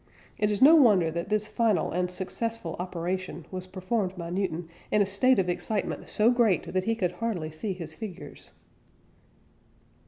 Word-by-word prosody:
It 210 -1 +2
is 210 +3 +1
no 300 +4 +9
wonder 205 - +5
that 170 +3 -4
this 215 0 +1
final 215 -1 +1
and 180 +1 0
successful 190 0 -3
operation 180 -1 -4
was 185 -1 -5
performed 185 +1 -2
by 170 -1 -5
Newton 175 -3 -2 0.2
"in 210 - +2
a - - -1
state 225 +7 +3
of 190 - +1
excitement 195 +4 -2
so 220 +3 +4
great 235 -9 +2
that 185 0 0
he 225 - +1
could 185 -6 0
hardly 190 -9 -3
see 190 +6 -4
his 165 -4 -6
figures." 195 0 -9
190 Hz, 165 wpm, -27 LUFS, 180-215 Hz, 0.2 s, no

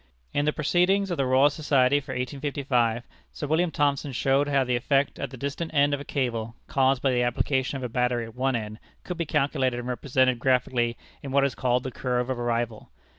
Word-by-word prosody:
In 145 - +1
the 150 - +3
Proceedings 180 +6 +1
of 175 - -1
the 135 - +1
Royal 135 +3 +5
Society 145 -2 +2
for 140 - -7
1855, 125 -3 -1 0.3
Sir - - -5
William 160 +4 +1
Thomson 145 -2 0
showed 135 +3 +1
how 140 -2 +2
the 125 -1 0
effect 135 +3 +1
at 140 - -3
the 130 - -10
distant 140 +5 -4
end 145 0 +4
of 145 - -1
a - - -6
cable, 115 -5 -2
caused 135 -1 +1
by 135 - +3
the 125 -1 +1
application 130 +2 0
of 130 - -7
a - - -1
battery 125 -1 0
at 115 - -11
one 130 +1 0
end, 110 -1 -5 0.2
could 180 - -5
be 170 -3 -2
calculated 130 -3 +1
and 120 - -6
represented 130 0 +1
graphically 120 -2 +1 0.2
in 140 - -7
what 140 0 +3
is 140 - -1
called 125 0 0
the 130 - -4
"curve 125 +1 -1
of 125 - -3
arrival." 120 -2 -2
130 Hz, 215 wpm, -26 LUFS, 125-140 Hz, 0.3 s, Royal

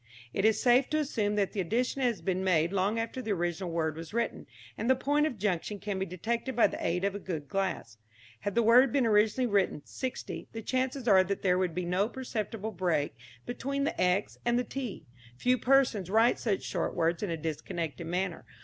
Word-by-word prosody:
It 195 - 0
is 220 -1 +4
safe 250 +1 +4
to 305 - +1
assume 220 -9 0
that 200 -2 +1
the 200 - 0
addition 245 +9 -1
has 240 -4 0
been 190 -1 0
made 170 -1 +2
long 200 +3 +1
after 230 +3 -3
the 220 -4 -1
original 175 0 -2
word 160 -2 -1
was 165 +6 -8
written, 235 0 -2 0.3
and 225 +4 -2
the 260 - +6
point 290 +3 +2
of 250 - -5
junction 205 0 -1
can 200 -1 -4
be 190 - -2
detected 230 +8 -3
by 235 - +5
the - - -2
aid 175 +2 0
of 200 0 +1
a 205 - -5
good 160 -7 -5
glass. 170 - -3 0.4
Had 205 - -3
the 235 - +4
word 245 +3 +6
been 270 -1 +2
originally 215 +3 +3
written 200 -9 +1
sixty, 260 -1 -5
the 225 0 -6
chances 255 +1 -1
are 190 -3 +7
that 200 +1 -3
there 180 -1 +3
would 180 -3 -1
be 180 -1 -2
no 185 +5 +1
perceptible 225 -4 -4
break 175 -6 0 0.3
between 275 +3 -2
the 285 - -1
x 180 +3 +1
and 240 0 +2
the 250 - +1
t. 250 -5 -6 0.3
Few 250 - +3
persons 245 -8 +3
write 225 +4 +4
such 210 -5 -1
short 175 - -2
words 165 +1 +1
in 205 - -2
a 165 - -2
disconnected 160 0 -4
manner. 180 0 -2
205 Hz, 210 wpm, -30 LUFS, 180-240 Hz, 0.4 s, are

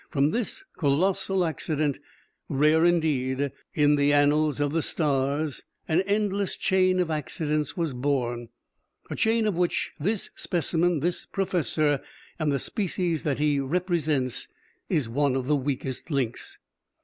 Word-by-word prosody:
From 140 +1 +2
this 245 - -1
colossal 185 +5 +1
accident, 155 -3 -1 0.5
rare, 155 +4 +4
indeed, 140 -5 +1 0.2
in 145 -1 +4
the 145 0 +3
annals 145 0 +3
of 145 -1 +1
the 165 - +2
stars, 145 -1 0 0.3
an 165 +2 +3
endless 200 -1 0
chain 185 -2 +2
of 175 -3 0
accidents 150 +1 -2
was 165 -5 -1
born, 125 -3 -1 0.6
a - - -2
chain 225 0 +2
of 210 - +1
which 175 0 0
this 200 +7 -1
specimen, 170 -1 +1
this 175 +3 -1
professor, 160 -7 0 0.4
and 155 -2 +1
the 140 - +1
species 180 - -1
that 145 -3 -1
he 145 -1 +2
represents, 155 -4 0 0.4
is 145 -7 +1
one 135 +3 +1
of 130 -1 -1
the 150 +3 +2
weakest 135 -1 -3
links. 130 -6 -2
150 Hz, 135 wpm, -26 LUFS, 140-175 Hz, 0.6 s, rare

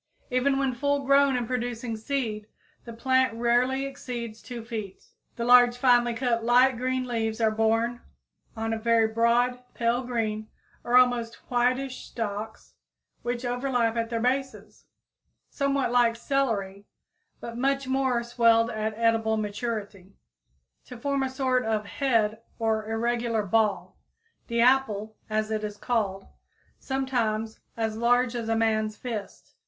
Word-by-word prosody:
Even 265 +2 +2
when 270 -1 0
full 285 +2 -1
grown 275 0 +4
and 245 -1 -1
producing 240 -1 -3
seed, 220 -3 -3 0.4
the 235 - -8
plant 260 +1 +1
rarely 245 +3 +1
exceeds 240 -5 -6
2 235 -2 -8
feet. 215 -5 -6 0.3
The 235 - -3
large, 245 0 +6
finely 245 -2 +3
cut, 235 -1 0
light 250 +2 +4
green 255 +1 -1
leaves 225 -2 -2
are 220 -1 +3
borne 225 +2 +1 0.6
on 225 0 -1
very 230 0 +3
broad, 235 +2 +2 0.2
pale 235 +1 +1
green 220 -3 -2 0.3
or 245 +1 +3
almost 245 -2 +3 0.2
whitish 255 +2 0
stalks, 215 -1 -6 0.5
which 240 +1 -3
overlap 245 -2 0
at 230 -1 -1
their 230 -1 -2
bases, 265 +3 -2 0.7
somewhat 275 -3 0
like 240 -2 +3
celery, 220 -7 -2 0.5
but 235 - -7
much 275 +2 0
more 260 -2 +1
swelled 230 -1 +3
at 215 0 -3
edible 225 -1 +2
maturity, 205 -2 -5 0.7
to 250 - -10
form 280 +3 -1
a 265 - 0
sort 260 -1 0
of 220 -1 -1
head 225 -3 0 0.2
or 220 -1 -1
irregular 230 0 0
ball, 210 0 0 0.5
the 235 -1 0
"apple," 220 -4 +2
as 215 0 -1
it 215 -1 -1
is 210 -1 -5
called, 205 -4 -1 0.5
sometimes 235 -5 -2 0.2
as 220 -1 -1
large 245 +1 +2
as 230 -2 -3
a 225 - +2
man's 220 -1 0
fist. 225 -5 -7
235 Hz, 135 wpm, -26 LUFS, 220-250 Hz, 0.7 s, large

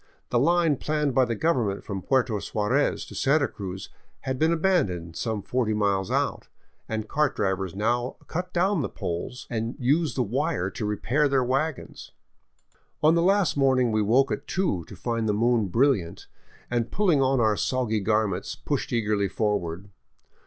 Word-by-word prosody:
The 120 - +3
line 165 +1 +3
planned 150 -1 -1
by 130 0 +4
the 115 -1 -2
government 115 -9 0
from 100 -2 -5
Puerto 125 -2 +1
Suarez 115 +9 0
to - - -12
Santa 140 +1 +2
Cruz 95 -2 -7 0.3
had 130 -1 -3
been 160 +1 +3
abandoned 140 - 0
some 110 -4 -3
forty 120 -4 0
miles 100 -2 0
out, - - -1 0.4
and 110 -1 -3
cart 150 +2 +1
drivers 95 -2 -1
now 120 +4 0
cut 180 +2 -4
down 185 0 +1
the - - -2
poles 90 +9 -5
and 115 +1 -3
use 145 0 +1
the 125 - +1
wire 100 -5 -1
to 105 - -4
repair 125 +8 +1
their 135 -2 +2
wagons. 135 +4 -3 0.9
On 155 +1 +6
the 170 - +3
last 195 0 +3
morning 130 -4 +3
we 110 0 +2
woke 125 +7 +3
at - - -4
two 165 - -1
to - - -11
find 115 -2 -2
the - - +2
moon 115 -1 +2
brilliant, 115 -4 +1 0.5
and 120 -1 0
pulling 180 -8 +2
on 135 0 +2
our 110 -2 +3
soggy 120 -2 0
garments, 105 -2 0
pushed - - -3
eagerly 105 -3 +1
forward. 100 -2 -2
120 Hz, 165 wpm, -26 LUFS, 105-140 Hz, 0.9 s, On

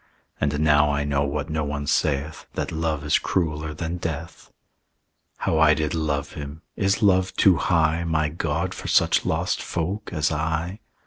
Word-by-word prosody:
"And 75 0 0
now 75 -1 +4
I 70 0 0
know, 70 -1 +1
what 70 +2 -3
no 80 0 0
one 70 0 -3
saith, 75 +1 0
That - - -2
love 80 -2 -1
is 75 - +3
crueller 80 -3 -1
than 85 +2 -3
death. 85 0 -6 0.9
"How 80 - 0
I 80 -1 +6
did 75 0 -1
love 75 -3 -1
him! 75 +2 -8
Is 95 +1 +1
love 95 -2 +3
too 95 -4 +5
high, 80 +2 +2
My 80 -2 +1
God, 80 +4 -2
for - - -7
such - - +3
lost - - 0
folk 95 +6 -3
as 80 -2 0
I?" 80 +5 -2
80 Hz, 170 wpm, -24 LUFS, 75-85 Hz, 0.9 s, I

